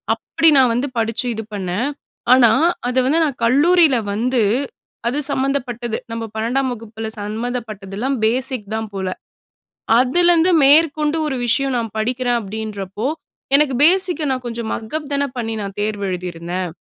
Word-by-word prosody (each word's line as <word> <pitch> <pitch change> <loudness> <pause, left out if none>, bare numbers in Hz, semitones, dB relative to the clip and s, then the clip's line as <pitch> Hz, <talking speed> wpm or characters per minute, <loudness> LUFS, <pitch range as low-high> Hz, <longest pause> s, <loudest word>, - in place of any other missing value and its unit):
அப்படி 325 - +2
நான் 255 -3 +5
வந்து 250 +4 -1
படிச்சு 230 +2 -1
இது 220 0 -5
பண்ணேன், 195 +6 -2 0.5
ஆனா 240 -4 +6 0.4
அதை 255 - +1
வந்து 320 +5 +3
நான் 275 -6 -4
கல்லூரியில 300 +3 +4 0.2
வந்து, 240 +3 +1 0.7
அது 275 - -3
சம்மந்தப்பட்டது 250 -4 -2 0.2
நம்ம 230 0 -4
12டாம் 250 +4 0
வகுப்பில 225 -1 -7
சம்மந்தப்பட்டதெல்லாம் 220 +2 -4
பேசிக் 250 -2 -1
தான் 220 -1 -4
போல, 190 -1 -3 0.9
அதிலிருந்து 345 +6 +4
மேற்கொண்டு 300 +1 +4
ஒரு 265 - -2
விஷயம் 270 +2 +1
நான் 225 -3 -4
படிக்கிறேன் 245 +2 0
அப்படின்றப்போ, 210 +1 -5 0.5
எனக்கு 280 -2 +4
பேசிக் 360 +2 +3
கா 305 - -1
நான் 255 -1 -2
கொஞ்சம் 235 -2 -4
மக்அப் 290 +7 -5
தான 280 0 +1
பண்ணி 225 -2 -3
நான் 200 -1 -5
தேர்வு 210 -1 -2
எழுதியிருந்தேன். 180 0 -4
240 Hz, 140 wpm, -19 LUFS, 215-275 Hz, 0.9 s, ஆனா